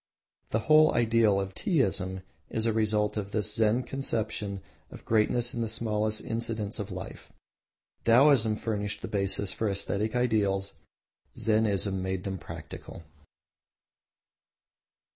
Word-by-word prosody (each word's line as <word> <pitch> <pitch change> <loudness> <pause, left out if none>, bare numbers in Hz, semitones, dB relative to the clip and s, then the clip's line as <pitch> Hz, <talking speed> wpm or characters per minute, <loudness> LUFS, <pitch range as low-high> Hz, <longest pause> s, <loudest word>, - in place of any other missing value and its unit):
The 110 - 0
whole 155 +1 +6
ideal 115 -3 +3
of 95 -1 -4
Teaism 95 - 0 0.3
is 110 0 -1
a 115 - +2
result 105 -1 +1
of 100 -2 -3
this 105 0 0
Zen 110 +3 +2
conception 110 -7 -3 0.3
of - - -12
greatness 115 +2 +1
in 120 - -3
the 115 - 0
smallest 110 -1 -1
incidents 115 -2 -3
of 105 0 -4
life. 90 0 -8 0.7
Taoism 115 -2 +5
furnished 105 -2 -3
the - - -3
basis 100 -1 -1
for 110 - -1
aesthetic 100 +3 -1
ideals, 100 -6 +1 0.6
Zennism 105 -3 +2
made 95 0 -3
them 95 -2 -4
practical. 85 - -9
110 Hz, 125 wpm, -28 LUFS, 100-115 Hz, 0.7 s, whole